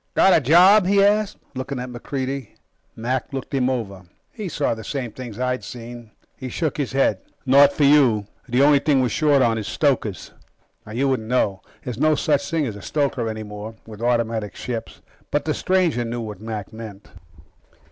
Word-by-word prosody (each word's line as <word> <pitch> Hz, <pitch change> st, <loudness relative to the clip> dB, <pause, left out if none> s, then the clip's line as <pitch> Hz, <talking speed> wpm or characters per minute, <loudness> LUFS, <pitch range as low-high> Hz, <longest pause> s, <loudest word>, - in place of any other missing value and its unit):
"Got 190 Hz, -, +5 dB
a -, -, +5 dB
job?" 180 Hz, -, +6 dB
he 200 Hz, 0 st, +4 dB
asked, 210 Hz, 0 st, +2 dB, 0.2 s
looking 130 Hz, 0 st, -4 dB
at 125 Hz, 0 st, -5 dB
MacReidie. 130 Hz, 0 st, -5 dB, 0.4 s
Mac 125 Hz, +3 st, -2 dB
looked 135 Hz, +1 st, -6 dB
him 130 Hz, -2 st, +2 dB
over. 105 Hz, -7 st, -3 dB, 0.3 s
He 210 Hz, -5 st, -6 dB
saw 145 Hz, -5 st, 0 dB
the 110 Hz, -1 st, -8 dB
same 130 Hz, -3 st, -4 dB
things 120 Hz, -2 st, -8 dB
I'd 125 Hz, 0 st, -1 dB
seen. 120 Hz, -1 st, -9 dB, 0.3 s
He 130 Hz, -2 st, -7 dB
shook 155 Hz, +2 st, -2 dB
his 140 Hz, -3 st, -2 dB
head. 135 Hz, -8 st, +2 dB, 0.3 s
"Not 140 Hz, +2 st, +6 dB
for 145 Hz, -, 0 dB
you. 135 Hz, -8 st, +5 dB, 0.2 s
The 125 Hz, +3 st, +3 dB
only 145 Hz, 0 st, +6 dB
thing 135 Hz, -2 st, +2 dB
we're 125 Hz, -, +1 dB
short 145 Hz, -1 st, +3 dB
on 115 Hz, -2 st, +2 dB
is 105 Hz, -, -5 dB
stokers." 130 Hz, -, -1 dB, 0.6 s
You 130 Hz, +5 st, 0 dB
wouldn't 125 Hz, -5 st, -1 dB
know. 100 Hz, -7 st, +1 dB, 0.2 s
There's 125 Hz, -2 st, -5 dB
no 155 Hz, +1 st, +4 dB
such 145 Hz, -2 st, 0 dB
thing 165 Hz, -3 st, 0 dB
as 110 Hz, -5 st, -4 dB
a 100 Hz, -, -10 dB
stoker 135 Hz, -3 st, -1 dB
any 110 Hz, 0 st, -5 dB
more, 105 Hz, +1 st, -8 dB
with 110 Hz, -1 st, -11 dB
automatic 115 Hz, -3 st, 0 dB
ships. 115 Hz, -2 st, -6 dB, 0.3 s
But 145 Hz, -, -1 dB
the 155 Hz, -, 0 dB
stranger 180 Hz, -10 st, +1 dB
knew 120 Hz, +1 st, -4 dB
what 105 Hz, -3 st, -7 dB
Mac 110 Hz, -3 st, -6 dB
meant. 110 Hz, -3 st, -10 dB
130 Hz, 190 wpm, -22 LUFS, 115-145 Hz, 0.6 s, job